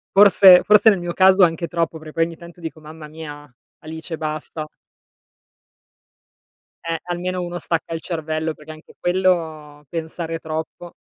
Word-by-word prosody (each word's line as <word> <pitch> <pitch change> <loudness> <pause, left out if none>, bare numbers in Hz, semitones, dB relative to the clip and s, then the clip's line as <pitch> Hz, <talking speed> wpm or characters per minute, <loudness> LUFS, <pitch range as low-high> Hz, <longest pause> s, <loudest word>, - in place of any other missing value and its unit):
Forse 195 -2 +8
forse 210 +1 +6
nel 200 -4 +2
mio 175 0 -4
caso 190 +1 +5
anche 170 0 +1
troppo, 165 0 -2
perc 155 0 -11
poi 165 - +2
ogni 165 0 -8
tanto 170 0 -14
dico: 160 -1 -7
"Mamma 155 0 -11
mia, 150 -1 -10 0.3
Alice 160 +1 -7
basta." 155 0 -5 2.2
Eh, 165 -1 -2
almeno 180 +1 -3
uno 175 0 -5
stacca 165 -1 -3
il 165 - -4
cervello 160 -1 -3
perché 155 +1 -12
anche 155 +1 -15
quello, 160 -5 -1
pensare 165 0 -5
troppo 160 +2 -6
165 Hz, 145 wpm, -21 LUFS, 155-175 Hz, 2.2 s, Forse